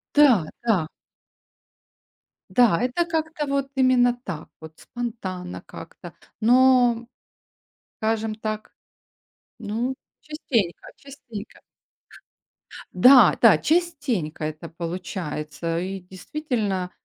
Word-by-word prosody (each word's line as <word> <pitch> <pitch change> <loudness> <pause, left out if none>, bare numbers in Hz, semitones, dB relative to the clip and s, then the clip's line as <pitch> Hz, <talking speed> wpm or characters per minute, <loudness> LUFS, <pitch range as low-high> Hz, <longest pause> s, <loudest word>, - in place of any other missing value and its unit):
Да, 260 - +6 0.2
да. 195 -9 +2 1.6
Да, 235 -9 +4
это 255 +8 0
как-то 315 -2 -2
вот 275 0 -1
именно 255 -2 +4
так 160 -8 -7
вот 160 0 -12
спонтанно 190 -7 -6
как-то, - - -11 0.3
но, 245 0 +4 0.9
скажем 220 0 -1
так, 215 0 -5 0.9
ну 230 +4 -3 0.3
частенько, 235 - -2
частенько. 240 -6 -11 1.3
Да, 255 +8 +7
да - - +7
частенько 285 - -1
это 155 +2 -6
получается. 165 -2 -4
И 190 +2 -4
действительно, 190 - -3
225 Hz, 85 wpm, -24 LUFS, 180-260 Hz, 1.6 s, Да